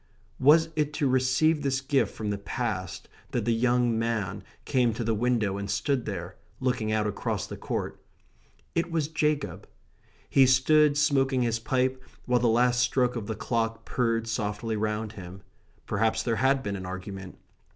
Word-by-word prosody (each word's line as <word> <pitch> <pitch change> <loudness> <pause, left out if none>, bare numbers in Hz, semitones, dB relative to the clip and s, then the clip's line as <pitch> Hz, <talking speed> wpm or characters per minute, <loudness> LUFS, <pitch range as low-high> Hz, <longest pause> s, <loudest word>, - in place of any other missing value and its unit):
Was 160 +4 +5
it 150 -1 0
to 145 -1 0
receive 130 +5 +2
this 135 -2 0
gift 135 -5 0
from 105 -2 -3
the 100 - -3
past 100 -6 -4 0.3
that 120 -4 -1
the 120 - +2
young 120 0 +2
man 110 -4 -2 0.2
came 125 -5 +2
to 120 - -3
the 115 0 +1
window 110 -3 0
and 100 0 -5
stood 135 0 0
there, 90 -3 -5 0.2
looking 125 -4 0
out 110 -1 +1
across 105 - -2
the - - -7
court? - - -4 0.7
It 170 +1 0
was 160 -3 0
Jacob. 150 -2 -1 0.6
He 135 -1 +5
stood 145 +3 +4
smoking 135 -4 +2
his 115 -1 0
pipe 130 +2 0 0.2
while 125 0 +2
the 120 - +2
last 120 +2 +3
stroke 125 0 +2
of 110 -4 -4
the 110 - -3
clock 115 +1 -2
purred 115 -2 0
softly 110 0 -2
round 105 0 -2
him. 95 -2 -10 0.4
Perhaps 110 +2 0
there 115 -2 0
had 135 +1 +2
been 100 -1 -3
an 95 -1 -6
argument. 95 0 -7
120 Hz, 170 wpm, -27 LUFS, 105-130 Hz, 0.7 s, Was